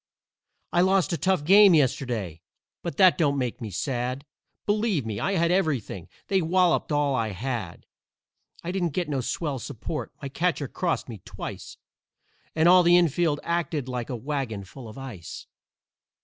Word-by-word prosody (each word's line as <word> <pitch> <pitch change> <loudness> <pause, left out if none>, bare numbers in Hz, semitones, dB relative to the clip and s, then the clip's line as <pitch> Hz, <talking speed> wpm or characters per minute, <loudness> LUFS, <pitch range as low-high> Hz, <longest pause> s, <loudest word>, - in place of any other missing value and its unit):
"I 175 - +4
lost 190 0 +2
a - - +2
tough 185 0 +1
game 195 +1 +7
yesterday, 120 - 0 0.4
but 170 - -5
that 185 -3 +5
don't 145 -3 +2
make 125 -3 -3
me 110 - -4
sad; 125 - -3 0.4
Believe 205 - +1
me, 105 -2 -4
I 195 - 0
had 170 -2 +2
everything 140 - -1 0.2
they 195 -1 +1
walloped 175 0 +2
all 145 -1 +2
I 115 -4 0
had. 115 -4 -5 0.8
I 170 - -3
didn't 175 -5 -1
get 175 -3 -1
no 135 -3 -1
swell 140 +1 -3
support; 120 +7 -5
my 140 - -5
catcher 150 0 -1
crossed 175 +3 -2
me 110 -6 -9
twice - - -8 0.8
And 160 +1 +4
all 180 +1 +8
the 175 0 +6
infield 165 -2 +2
acted 170 -5 -2
like 125 -2 -4
a 125 - -3
wagon 125 -5 -3
full 115 +5 -11
of 110 - -11
ice. 120 -12 -8
145 Hz, 165 wpm, -26 LUFS, 125-175 Hz, 0.8 s, all